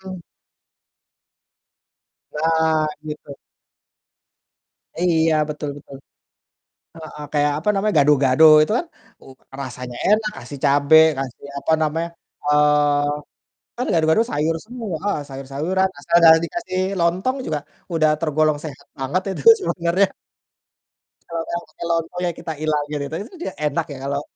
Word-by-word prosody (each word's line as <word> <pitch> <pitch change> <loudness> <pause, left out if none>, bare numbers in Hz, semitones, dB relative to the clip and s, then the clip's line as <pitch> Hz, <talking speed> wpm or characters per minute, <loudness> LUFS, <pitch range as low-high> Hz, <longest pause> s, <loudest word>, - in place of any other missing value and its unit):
mhm. 175 - -11 2.1
Nah, 160 0 +1 0.2
gitu. 150 -1 -8 1.7
Iya, 165 -2 +2 0.2
betul 150 0 -4
betul. 140 -1 -12 1.0
Heeh, 155 -2 -10
kayak 145 0 +2
apa 160 - -4
namanya, 210 +1 0
gado-gado 140 0 +4 0.2
itu 155 - 0
kan, 345 - -4 0.4
uh, 135 - -14 0.3
rasanya 125 -2 -7
enak, 215 +1 +2
kasih 130 +3 -9
cabe, 145 +2 +4 0.2
kasih 135 -1 -6
apa 160 - -1
namanya, 160 +2 -1 0.4
eee, 150 0 +1 0.4
kan 250 +2 -2
gado-gado 160 +5 +3
sayur 160 -3 0
semua, 225 -6 -5
heeh, 205 -5 0
sayur-sayuran 140 +8 -1
asal 170 +4 +1
jangan 160 0 +8
dikasih 185 - -4 0.2
lontong 185 +10 +1
juga, 155 -1 -1 0.3
udah 155 -2 +3
tergolong 155 -1 +1
sehat 140 -2 -9
banget 135 +8 -1
itu 190 - -5 0.2
sebenarnya. 185 - +1 1.2
Kalau 165 -1 -3
udah 170 - -3
pakai - - -8
lontong 165 +1 -2
ya 175 - 0
kita 160 - -5
ilangin, 150 -1 -1 0.2
gitu, 140 - -6
itu 215 - -9
kan 360 - -11
juga - - -4
enak 145 - -1
ya, - - -8
kalau 140 0 -1
155 Hz, 130 wpm, -21 LUFS, 145-170 Hz, 2.1 s, jangan